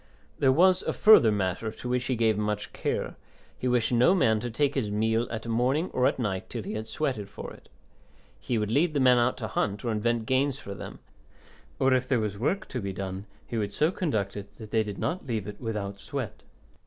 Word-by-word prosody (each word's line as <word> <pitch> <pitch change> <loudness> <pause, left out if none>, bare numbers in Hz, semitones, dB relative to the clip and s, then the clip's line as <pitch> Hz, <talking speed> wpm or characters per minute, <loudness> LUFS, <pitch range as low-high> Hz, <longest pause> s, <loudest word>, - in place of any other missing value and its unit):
There 135 -2 +5
was 185 +6 +5
a - - -2
further 210 - +7
matter, 100 +2 -1
to 125 - -8
which 125 0 0
he 130 - 0
gave 110 -2 +2
much 105 0 -2
care; - - -2 0.4
he 130 - -3
wished 125 -2 +2
no 125 +10 +5
man 110 - +3
to 120 - -4
take 140 +5 +1
his 120 -7 -1
meal 110 +3 +1
at 110 -1 -5
morning 125 +9 +1
or 125 - +3
at - - 0
night 95 -7 -2
till 115 -3 -5
he - - -5
had 110 +1 -4
sweated 115 -6 -2
for - - -8
it. - - -17 0.7
He 120 - -1
would 105 -1 -1
lead 155 +5 +2
the - - +3
men 125 -2 +5
out 120 +1 +1
to 110 - -4
hunt, 105 +2 -2
or 115 - 0
invent 115 +1 0
games 135 +2 +1
for 100 - -7
them, - - -8 0.8
or 135 0 +3
if 130 0 +1
there 130 -3 +2
was 105 -2 -2
work 150 - -1
to 125 - -3
be 100 -1 -3
done, 95 +1 -5 0.2
he 115 - -3
would 100 -1 -2
so 155 +3 +2
conduct 110 - -1
it 100 -1 -7
that 110 -2 -10
they 110 - +3
did 105 -2 -5
not 175 -3 -3
leave 110 -5 -2
it 105 - -8
without 105 -4 -4
sweat. - - -5
115 Hz, 230 wpm, -27 LUFS, 105-130 Hz, 0.8 s, further